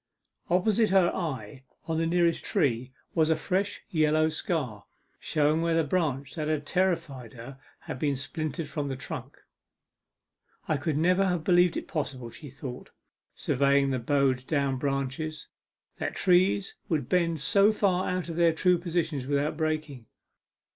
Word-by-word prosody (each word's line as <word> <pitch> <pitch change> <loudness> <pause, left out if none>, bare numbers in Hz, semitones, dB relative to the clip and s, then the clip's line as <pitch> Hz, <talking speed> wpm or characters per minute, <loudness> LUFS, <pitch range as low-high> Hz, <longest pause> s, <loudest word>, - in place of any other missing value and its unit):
Opposite 210 +5 +3
her 185 -2 +3
eye, 145 -5 -4 0.2
on 160 -1 -1
the 165 - +1
nearest 170 -1 +2
tree, 130 - 0 0.2
was 160 -2 +2
a 160 - +4
fresh 195 +4 -1
yellow 155 -1 +3
scar, 145 - -3 0.3
showing 155 +1 +1
where 165 0 +1
the 165 - +3
branch 140 -4 -1
that 155 -2 -3
had 155 -2 -1
terrified 165 -10 -1
her 130 +3 -10 0.2
had - - -7
been 145 -1 +1
splintered 155 +2 -4
from 145 -1 -3
the 135 - -3
trunk. 130 - -7 1.3
'I 155 +1 0
never 180 +6 +3
could 195 - +3
have 175 -3 -1
believed 175 0 +4
it - - -5
possible,' 130 -6 -4
she 145 +2 -10
thought, 130 -1 -8 0.5
surveying 140 0 +2
the 130 - 0
bowed 130 0 +1
down 140 -3 0
branches, 140 +3 -3 0.5
'that - - -3
trees 190 +2 +3 0.2
would 160 -5 0
bend 170 -3 +1
so 200 +8 +4
far 190 -4 +1
out 180 -1 -2
of 165 -1 -5
their 170 -1 +4
true 180 +2 +3
positions 165 -6 -2
without 145 +2 0
breaking. 155 -6 -3
155 Hz, 155 wpm, -28 LUFS, 140-175 Hz, 1.3 s, a